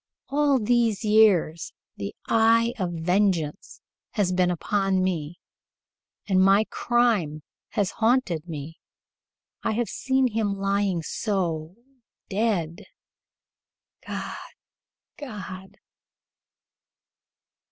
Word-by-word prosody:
All 285 -1 +3
these 230 -2 +1
years 205 -7 +3 0.2
the 100 -1 -6
eye 230 +1 +4
of 180 -2 -1
vengeance 175 -1 0 0.3
has 200 -4 +1
been 180 0 +2
upon 190 +2 0
me, 175 -3 -2 0.9
and 190 -2 +3
my 195 +3 +5
crime 215 -12 +1 0.3
has 200 -2 0
haunted 220 -9 +1
me. 155 +1 -7 0.8
I - - -1
have 235 +1 -1
seen 265 -1 +1
him 210 -3 -1
lying 195 -3 0
so 170 -5 -2 0.5
dead. 195 -3 -1 1.2
God! - - -5 0.8
God!" 200 - -8
195 Hz, 90 wpm, -25 LUFS, 175-225 Hz, 1.2 s, my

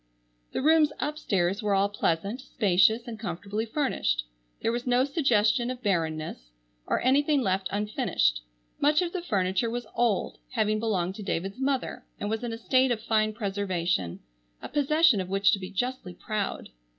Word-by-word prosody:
The - - -2
rooms 310 -1 +5
upstairs 200 - 0
were 205 -2 +1
all 195 +1 +3
pleasant, 200 +4 -1
spacious, 220 0 +2
and 225 -2 -6
comfortably 205 +2 -4
furnished. 220 - 0 0.4
There 225 - +1
was 240 +2 -3
no 250 +1 +3
suggestion 240 -5 +2
of 255 -1 -6
bareness 160 - -2 0.4
or - - +1
anything 285 +1 +3
left 190 -2 0
unfinished. 205 - 0 0.4
Much 300 +4 +3
of 345 - -3
the 365 - -2
furniture 195 - 0
was 240 0 -4
old, 235 -5 0
having 215 -2 +1
belonged 190 -5 0
to - - -7
David's 195 +5 -3
mother, 270 -1 -1 0.2
and 205 - -3
was 225 +2 -2
in 240 - -3
a 225 - -4
state 255 +3 +3
of 240 -3 0
fine 215 -1 +1
preservation, 185 - -2 0.4
a - - -8
possession 295 - +3
of 185 - -6
which 195 +1 +3
to 200 - +1
be 185 -1 -6
justly 200 -3 -3
proud. 215 -2 -3
215 Hz, 165 wpm, -27 LUFS, 195-255 Hz, 0.4 s, rooms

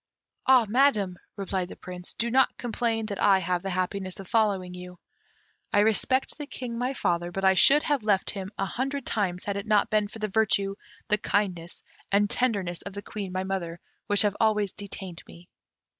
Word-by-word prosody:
"Ah, 255 -3 +6
Madam," 210 -6 +2 0.2
replied 190 -2 -3
the - - -9
Prince, 180 -1 -8
"do 235 0 -1
not 265 +2 +3
complain 230 -2 -1
that 205 -2 -4
I 200 -2 +6
have 180 -1 -1
the 195 - -4
happiness 185 +1 -3
of 195 - -8
following 195 -5 +1
you. 180 0 -9 0.7
I 205 - +4
respect 240 +7 +2
the 295 - -5
King, 245 -4 -6
my 250 +3 -2
father; 175 -5 0
but 195 +2 -2
I 190 - +6
should 280 +10 +6
have 290 -3 +1
left 205 -3 +2
him 195 -2 -6
a 195 - 0
hundred 270 +7 -3
times 185 -4 -1
had 200 -1 -2
it 200 - -5
not 210 -1 +3
been 210 -1 +2
for 210 - -10
the 215 -1 -2
virtue, 200 -1 +1 0.4
the 210 0 +3
kindness, 180 -5 -2 0.3
and 205 +1 +4
tenderness 200 -8 0
of 200 - -8
the 200 +1 -7
Queen, 200 -4 -6
my 185 0 -2
mother, 180 -3 -4 0.3
which 205 0 +4
have 205 -1 +1
always 210 -3 +2
detained 190 -3 -7
me." 175 +1 -14
200 Hz, 195 wpm, -27 LUFS, 185-220 Hz, 0.7 s, Ah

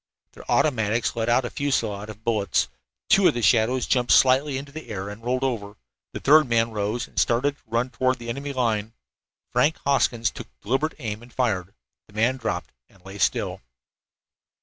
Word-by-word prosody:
Their - - -14
automatics 115 -6 +1
let 115 0 -1
out 120 +2 +3
a - - -5
fusillade 110 -7 -1
of 110 +1 -11
bullets. 110 - +1 0.4
Two 195 -2 +5
of - - +2
the 120 - -2
shadows 125 +3 +3
jumped 125 -2 +1
slightly 135 +2 +4
into 140 +1 -8
the 155 +2 -9
air, 100 -2 -4
and 105 +2 -9
then - - -16
rolled 130 +1 0
over. 105 -6 -2 0.4
The - - -5
third 150 -2 +5
man 115 0 +2
rose 105 +3 -2
and - - -3
started 130 +5 +2
to - - -31
run 115 +3 -1
toward 130 0 +1
the 120 -1 -10
enemy 140 +4 -4
line. 115 -4 -1 0.6
Frank 145 +6 +2
Hoskins 120 -4 +2
took - - -9
deliberate 135 +8 -1
aim 110 -6 -5
and 120 +1 -15
fired. 100 -8 -1 0.3
The 105 - -20
man 120 +4 +2
dropped 110 -8 -3 0.2
and 95 -1 -24
lay 95 +1 -9
still. - - 0
120 Hz, 190 wpm, -24 LUFS, 110-130 Hz, 0.6 s, Two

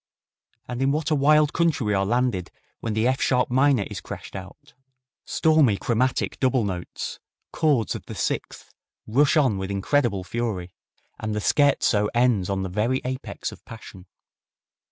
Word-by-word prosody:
And 125 +1 -4
in 135 +1 +3
what 155 +2 -1
a - - +4
wild 150 +1 +4
country 165 -7 +1
we 105 - +1
are 95 -1 +1
landed 120 -6 0 0.3
when 110 -2 -3
the 110 +2 +2
F 130 +1 0
sharp 125 -1 +2
minor 130 -3 +3
is - - -7
crashed - - -9
out! 95 +10 -10 0.5
Stormy 155 -10 +3
chromatic 125 +5 0
double 130 -2 +2
notes, 90 -3 -5 0.3
chords 145 -9 +1
of - - -8
the - - -7
sixth, - - -4 0.3
rush 145 +8 +3
on 130 -10 +2
with 95 0 -4
incredible 100 0 0
fury, 95 -4 -3 0.5
and 110 -1 -3
the - - -1
scherzo 110 -5 +2
ends 120 -6 +2
on 95 -1 -1
the 95 - -3
very 110 +8 0
apex 130 +1 -4
of - - -14
passion. 100 -4 -12
120 Hz, 160 wpm, -24 LUFS, 100-140 Hz, 0.5 s, a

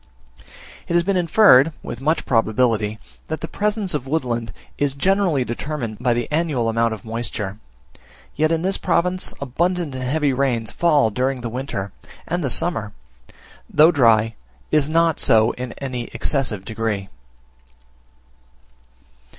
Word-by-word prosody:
It - - -3
has 170 0 +3
been 200 +2 0
inferred 165 -5 +5
with 120 - -7
much 155 +3 0
probability, 110 -2 +1 0.3
that 160 - -4
the 165 - -4
presence 210 -1 -1
of 135 -3 -3
woodland 120 -7 -2 0.3
is 140 -2 0
generally 180 -4 +1
determined 120 -3 -4
by 125 -1 +1
the 120 -1 -2
annual 150 -7 0
amount 115 0 +1
of 105 - -15
moisture; 110 -3 -4 0.8
yet 155 +2 +1
in 165 0 0
this 190 +1 -1
province 180 +2 0
abundant 170 +4 -1
and 130 0 -5
heavy 145 +2 +1
rain 125 -4 0
falls 145 -3 +2
during 130 +2 -1
the 120 - -4
winter; 125 -7 -4 0.4
and 175 +1 -2
the 135 - 0
summer, 115 -7 0 0.8
though 155 +3 +6
dry, 115 -6 +3 0.4
is 150 -1 +3
not 165 0 +2
so 110 0 +4
in 125 -1 -6
any 125 -3 -5
excessive 120 -9 0
degree. 110 -3 -3
130 Hz, 140 wpm, -21 LUFS, 115-160 Hz, 0.8 s, though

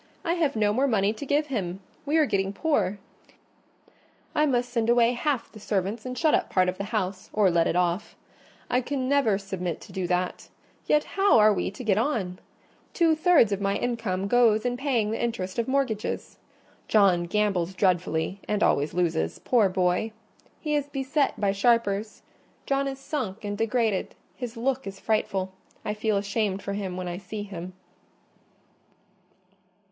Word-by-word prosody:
I 335 - +2
have 325 -7 0
no 210 -1 +2
more 265 +5 +2
money 210 -4 +2
to 245 +6 -8
give 295 +2 +2
him: 185 -5 -2 0.3
we 305 +3 +2
are 310 - +5
getting 195 -5 0
poor. 210 - 0 1.4
I 300 0 +3
must 245 -2 0
send 230 -2 0
away 240 0 +5
half 265 0 -1
the 215 - -12
servants 205 +3 -2
and 250 0 -5
shut 315 -2 +3
up - - +2
part 185 -1 +3
of 185 - -5
the 200 - -2
house; 190 -2 -3
or 205 -4 +3
let 170 -1 +3
it - - 0
off. 180 +3 0 0.5
I 250 - +1
can 260 0 -2
never 270 -8 +3
submit 190 -4 -4
to - - -12
do 185 -2 -3
that—yet 180 - -2
how 390 -7 +3
are 215 -1 +6
we - - -1
to 200 +6 -9
get 210 -3 +2
on? 215 -9 -1 0.6
Two 330 -2 +4
thirds 315 - +4
of 200 0 -1
my 200 0 +1
income 210 -5 -2
goes 230 -1 +4
in 245 0 0
paying 245 -5 0
the 225 - -2
interest 210 -4 -2
of 235 - 0
mortgages. 260 -6 -2 0.5
John 190 -5 +4
gambles 190 -2 0
dreadfully, 180 -1 0
and 210 0 +1
always 145 +4 +2
loses—poor 180 - +1
boy! 185 +4 0 0.5
He 300 -2 -2
is 290 -1 0
beset 275 +1 0
by 200 -2 +2
sharpers: 210 0 +1 0.4
John 275 0 +1
is 270 -1 -4
sunk 240 -8 -4
and 205 0 -2
degraded—his 225 +2 -2
look 260 0 -1
is 195 0 -7
frightful—I 195 -1 -3
feel 215 -1 0
ashamed 200 -1 -1
for 200 - -3
him 190 -3 -4
when 185 -1 -4
I 175 +1 -4
see 205 +2 -6
him." 185 -3 -7
210 Hz, 165 wpm, -26 LUFS, 190-250 Hz, 1.4 s, are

